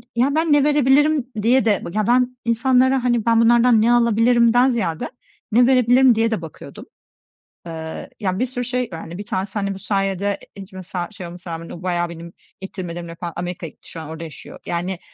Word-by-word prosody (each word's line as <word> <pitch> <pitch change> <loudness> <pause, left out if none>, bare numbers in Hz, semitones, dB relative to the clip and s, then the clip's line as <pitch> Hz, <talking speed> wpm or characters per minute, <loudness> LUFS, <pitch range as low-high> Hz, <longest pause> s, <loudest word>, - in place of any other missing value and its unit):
ya, 265 +5 +2
ben 320 -1 +2
ne 290 -1 +4
verebilirim 290 -1 +3
diye 240 +2 +3
de 210 -4 +1
Ya, 215 -1 0
ben 250 +1 +2
insanlara, 255 +2 +2
hani, 240 -3 +1
ben 230 -1 +4
bunlardan 235 0 +5
ne 230 +2 +3
alabilirimden 235 +1 +4
ziyade 210 -11 -1 0.4
ne 240 +3 +5
verebilirim 255 -1 +5
diye 225 +1 +1
de 220 - -1
bakıyordum. 160 -2 -10 0.8
Eee, 160 -1 -7
ya, 190 -3 -2
bir 255 - +2
sürü 245 -1 -4
şey, 250 -1 -2
yani, 165 +1 -8
1 205 - -7
tanesi, 190 0 -3
hani, 200 -1 -2
bu 190 - -9
sayede 195 0 -1 0.2
ilk 195 -1 -11
mesela, 185 -1 -5
şey 190 -4 -8
olmasına 175 0 -8
rağmen 165 +1 -7
o 175 - -9
bayağı 175 -1 -1
benim 170 0 -10 0.3
ittirmelerimle 175 -3 -7
falan 170 -1 -6
Amerika'ya 175 -1 -5
gitti, - - -20
şu 165 - -7
an 155 - -9
orada 160 +1 -7
yaşıyor. 160 -2 -10
Yani, 175 +1 -3
215 Hz, 190 wpm, -20 LUFS, 175-245 Hz, 0.8 s, bunlardan